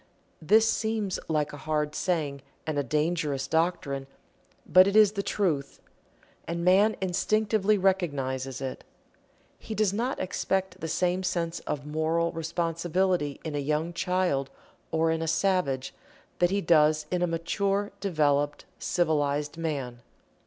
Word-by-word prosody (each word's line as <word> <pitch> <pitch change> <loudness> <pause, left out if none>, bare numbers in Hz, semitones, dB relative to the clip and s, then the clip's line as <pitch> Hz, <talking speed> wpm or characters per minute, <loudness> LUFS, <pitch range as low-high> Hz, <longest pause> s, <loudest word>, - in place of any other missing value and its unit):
This 220 +7 +5
seems 220 -3 -1
like 150 -2 0
a - - -7
hard 150 0 -1
saying 150 -7 -1 0.2
and 155 -2 -1
a - - 0
dangerous 150 -1 0
doctrine, 150 -5 0 0.6
but 185 +1 +6
it 200 - 0
is 215 -2 +7
the 200 -1 -2
Truth. 165 -9 -1 0.7
And 170 +1 -3
man 200 +4 +5
instinctively 210 +3 +1
recognizes 140 -9 -1
it. 130 -1 -5 0.8
He 220 - -6
does 210 -2 +2
not 240 +5 -1
expect 190 0 -2
the 160 - -3
same 180 +3 0
sense 170 -2 -2
of 145 -1 -3
moral 160 +2 0
responsibility 170 -1 -1
in 160 - -4
a 145 - -1
young 150 +4 -1
child, 175 -6 0 0.4
or 160 0 +1
in 160 0 -1
a 165 - -2
savage, 160 -8 0 0.5
that 175 - +4
he 200 +2 0
does 155 -2 +4
in 180 -1 0
a 180 - +2
mature, 195 +5 -1
developed, 145 -5 +1
civilized 150 -4 0
man. 140 -7 -4
165 Hz, 140 wpm, -27 LUFS, 150-190 Hz, 0.8 s, is